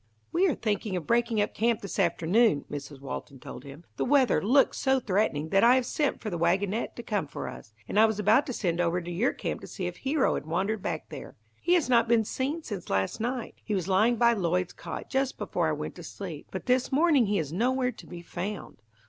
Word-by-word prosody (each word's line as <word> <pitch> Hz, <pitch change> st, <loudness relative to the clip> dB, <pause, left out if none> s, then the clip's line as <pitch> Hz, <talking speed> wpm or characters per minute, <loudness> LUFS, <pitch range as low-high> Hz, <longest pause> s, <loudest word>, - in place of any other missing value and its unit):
"We 375 Hz, +3 st, +3 dB
are 305 Hz, -, +1 dB
thinking 210 Hz, -2 st, -2 dB
of 175 Hz, -4 st, -3 dB
breaking 235 Hz, 0 st, +2 dB
up 205 Hz, -, -1 dB
camp 230 Hz, 0 st, +1 dB
this 200 Hz, -, -5 dB
afternoon," 175 Hz, +1 st, +2 dB
Mrs. 145 Hz, -1 st, -7 dB
Walton 140 Hz, 0 st, -7 dB
told 125 Hz, -, -9 dB
him. 140 Hz, +4 st, -11 dB
"The -, -, 0 dB
weather 270 Hz, -1 st, +3 dB
looks 265 Hz, +7 st, +3 dB
so 265 Hz, -1 st, +2 dB
threatening 185 Hz, -, 0 dB
that 195 Hz, +2 st, +3 dB
I 240 Hz, +2 st, +7 dB
have 260 Hz, -1 st, +1 dB
sent 295 Hz, +2 st, -1 dB
for 215 Hz, -, -4 dB
the 175 Hz, -, -3 dB
wagonette 190 Hz, +6 st, 0 dB
to 235 Hz, -, -7 dB
come 205 Hz, -8 st, -1 dB
for -, -, -6 dB
us, 110 Hz, -, -10 dB
and 210 Hz, -, +1 dB
I 220 Hz, -, +7 dB
was 220 Hz, -2 st, -2 dB
about 215 Hz, +7 st, +3 dB
to -, -, -2 dB
send 175 Hz, -6 st, 0 dB
over 175 Hz, +1 st, +1 dB
to 175 Hz, 0 st, -7 dB
your 200 Hz, +9 st, +1 dB
camp -, -, -4 dB
to -, -, -9 dB
see -, -, -5 dB
if -, -, -4 dB
Hero 275 Hz, +1 st, +1 dB
had -, -, -4 dB
wandered 195 Hz, +6 st, -1 dB
back -, -, -4 dB
there. -, -, -9 dB, 0.3 s
He 355 Hz, -, +3 dB
has 330 Hz, -8 st, +2 dB
not 240 Hz, -2 st, +4 dB
been 230 Hz, -1 st, +3 dB
seen 285 Hz, +9 st, -2 dB
since 200 Hz, -, -6 dB
last 95 Hz, -, 0 dB
night. 245 Hz, +1 st, -3 dB
He 210 Hz, -, -2 dB
was 185 Hz, -2 st, -2 dB
lying 215 Hz, +5 st, +3 dB
by 235 Hz, 0 st, +4 dB
Lloyd's 180 Hz, -3 st, 0 dB
cot -, -, -7 dB
just 265 Hz, -1 st, -1 dB
before -, -, -1 dB
I -, -, +1 dB
went -, -, -5 dB
to -, -, -9 dB
sleep, -, -, -7 dB
but -, -, -6 dB
this 255 Hz, +1 st, +1 dB
morning 285 Hz, -4 st, +4 dB
he 205 Hz, 0 st, +1 dB
is 155 Hz, -3 st, -3 dB
nowhere 250 Hz, +5 st, +1 dB
to 225 Hz, -, -14 dB
be 175 Hz, -1 st, -9 dB
found. 185 Hz, -, -6 dB
215 Hz, 240 wpm, -28 LUFS, 175-250 Hz, 0.3 s, I